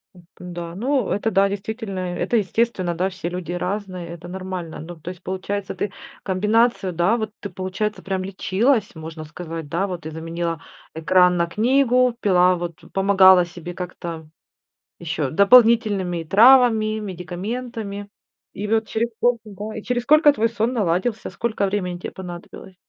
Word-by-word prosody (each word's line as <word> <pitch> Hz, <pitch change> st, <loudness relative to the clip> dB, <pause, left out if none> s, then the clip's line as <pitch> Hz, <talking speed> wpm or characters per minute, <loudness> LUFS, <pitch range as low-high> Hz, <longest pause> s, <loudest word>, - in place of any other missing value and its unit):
Это 175 Hz, -1 st, -17 dB, 0.2 s
да, 175 Hz, -1 st, -7 dB
ну, 255 Hz, +2 st, 0 dB
это 220 Hz, +2 st, 0 dB
да, 195 Hz, 0 st, +3 dB
действительно, 205 Hz, -1 st, -5 dB, 0.2 s
это 235 Hz, -, 0 dB
естественно, 200 Hz, -3 st, 0 dB
да, 185 Hz, +3 st, 0 dB
все 180 Hz, -2 st, -5 dB
люди 175 Hz, -1 st, -5 dB
разные, 185 Hz, -1 st, -4 dB
это 170 Hz, 0 st, -9 dB
нормально. 185 Hz, -2 st, -6 dB
Ну, 175 Hz, +2 st, -8 dB
то 170 Hz, -, -7 dB
есть, 180 Hz, -2 st, -10 dB
получается, 190 Hz, +1 st, -3 dB
ты 205 Hz, -, -3 dB, 0.3 s
комбинацию, 210 Hz, +1 st, +1 dB
да, 175 Hz, +7 st, +2 dB
вот 220 Hz, -2 st, -3 dB
ты, 200 Hz, -, -6 dB
получается, 190 Hz, +4 st, -3 dB
прям 190 Hz, -1 st, -2 dB
лечилась, 205 Hz, +4 st, 0 dB
можно 160 Hz, 0 st, -8 dB
сказать, 160 Hz, 0 st, -7 dB
да, 190 Hz, +4 st, 0 dB
вот 180 Hz, -2 st, -5 dB
ты 160 Hz, 0 st, -7 dB
заменила 165 Hz, 0 st, -4 dB, 0.3 s
экран 180 Hz, +3 st, +4 dB
на 170 Hz, 0 st, +1 dB
книгу, 250 Hz, +4 st, +3 dB
пила, 180 Hz, -3 st, +4 dB
вот, 175 Hz, -1 st, -5 dB, 0.2 s
помогала 190 Hz, -2 st, +6 dB
себе 175 Hz, 0 st, -8 dB
как-то 170 Hz, -3 st, -7 dB, 0.7 s
еще 155 Hz, -4 st, -2 dB
дополнительными 200 Hz, -, +4 dB
травами, 220 Hz, +1 st, +5 dB
медикаментами. 205 Hz, +3 st, -5 dB, 0.4 s
И 205 Hz, -, -5 dB
вот 220 Hz, +1 st, +1 dB
через 230 Hz, +2 st, -1 dB
сколько, 240 Hz, +1 st, +2 dB
да, 210 Hz, +1 st, -7 dB
и 215 Hz, -, -7 dB
через 245 Hz, 0 st, -1 dB
сколько 300 Hz, +3 st, +6 dB
твой 230 Hz, -2 st, +1 dB
сон 230 Hz, +2 st, -1 dB
наладился, 210 Hz, +1 st, -1 dB
сколько 215 Hz, +1 st, -1 dB
времени 185 Hz, -3 st, -2 dB
те -, -, -6 dB
понадобилось? 180 Hz, +1 st, -10 dB
190 Hz, 155 wpm, -22 LUFS, 175-220 Hz, 0.7 s, помогала